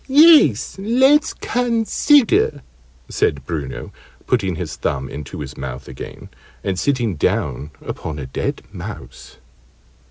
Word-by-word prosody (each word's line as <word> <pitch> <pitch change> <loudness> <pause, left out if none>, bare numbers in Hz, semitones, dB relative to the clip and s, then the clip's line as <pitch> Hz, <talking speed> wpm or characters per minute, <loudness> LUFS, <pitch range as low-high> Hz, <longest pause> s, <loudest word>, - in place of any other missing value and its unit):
"Yes, 285 - +6
let's 265 +9 +4
consider," 235 - +2 0.4
said 70 -2 0
Bruno, 75 -4 -5 0.3
putting 95 -8 0
his 80 -4 -5
thumb 65 -1 -2
into 75 -1 -7
his - - -7
mouth 65 0 -7
again, - - -9 0.3
and 95 -2 -1
sitting 120 - 0
down 70 0 -1 0.2
upon 80 -2 -5
a 70 - -5
dead 65 - -3
mouse. - - -9
105 Hz, 115 wpm, -20 LUFS, -, 0.4 s, Yes